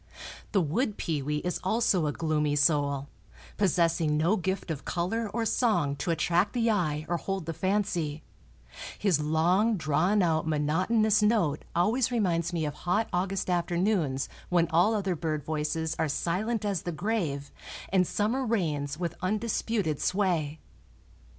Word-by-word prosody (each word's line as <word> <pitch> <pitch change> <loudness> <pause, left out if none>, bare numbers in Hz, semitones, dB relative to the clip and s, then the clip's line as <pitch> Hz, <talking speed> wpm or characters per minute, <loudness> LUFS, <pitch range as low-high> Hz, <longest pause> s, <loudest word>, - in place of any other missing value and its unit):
The 195 - +3
wood 205 - -1
pewee 150 -1 -2
is 180 - -1
also 190 -5 +2
a - - 0
gloomy 150 -2 0
soul, 145 -2 +2 0.5
possessing 165 -5 +2
no 165 +7 +3
gift 190 -2 -2
of 150 -3 -5
color 200 +6 -2
or 230 0 -1
song 210 - +1
to 180 - -3
attract 175 +4 +1
the 235 -2 +2
eye 155 -7 0
or 175 - 0
hold 195 0 -4
the 165 - -3
fancy; 175 -5 -1 0.7
his 190 -7 +2
long 175 +9 +2
drawn 175 +6 +2
out 160 -2 +1
monotonous 185 +9 +2
note 210 -9 +1
always 225 +9 +2
reminds 175 -7 0
me 165 -3 -1
of 150 - -3
hot 180 +8 -1
August 190 +2 -1
afternoons 175 -5 0 0.2
when 175 -1 +3
all 180 +7 +4
other 195 -3 -1
bird 155 -2 -2
voices 160 +1 -2
are 160 - +1
silent 210 +9 -1
as 195 -5 -1
the 175 - -4
grave 165 -6 -2 0.4
and 185 -2 +3
summer 230 +6 0
reigns 155 - -1
with 170 -1 -3
undisputed 210 -4 -1
sway. 170 -6 0
175 Hz, 145 wpm, -28 LUFS, 155-205 Hz, 0.7 s, all